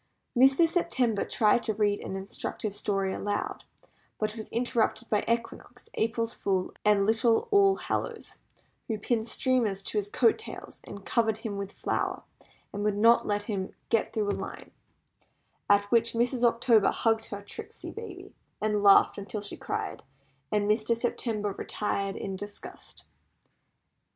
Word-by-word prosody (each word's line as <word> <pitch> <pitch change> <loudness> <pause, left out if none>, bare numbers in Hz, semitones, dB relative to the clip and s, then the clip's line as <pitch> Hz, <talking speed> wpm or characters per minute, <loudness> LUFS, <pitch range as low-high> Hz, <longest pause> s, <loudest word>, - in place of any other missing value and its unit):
Mr. 270 +6 +6
September 250 - +1
tried 215 +1 +3
to 220 -3 -2
read 205 -1 +1
an 190 - -5
instructive 195 +2 -4
story 195 -2 -1
aloud, 205 0 -3 0.5
but 215 0 -2
was 220 -2 -7
interrupted 235 -1 0
by 210 - +2
Equinox, 235 +1 -3
April 230 +1 0
Fool, 195 -5 -2
and 210 -1 +4
little 225 - +3
All 395 -1 +5
Hallows, - - -4 0.5
who 220 - -1
pinned 220 +1 -1
streamers 230 -7 +1
to 210 - 0
his 205 0 -4
coat 235 - +3
tails, 440 - -9 0.2
covered 220 -2 +1
him 220 -2 -5
with 200 0 -4
flour, - - -2 0.5
and 205 0 -3
would 210 -1 +1
not 230 +3 +5
let 205 0 0
him 195 -3 -4
get 225 - +1
through 210 -2 0
a - - 0
line; - - -7 1.0
at 200 0 +6
which 230 -1 +3
Mrs. 240 +1 0
October 230 -2 +4
hugged 225 -1 +1
her 200 -1 -7
tricksy 445 - -8
baby, 385 -4 -9 0.3
and 210 -1 0
laughed 200 0 +6
until 200 +1 -5
she 205 - -6
cried, - - -4 0.5
and 205 -1 +1
Mr. 215 +2 +2
September 225 -3 -1
retired 195 0 -2
in 195 - -4
disgust. 205 +2 -9
220 Hz, 145 wpm, -28 LUFS, 205-235 Hz, 1.0 s, Mr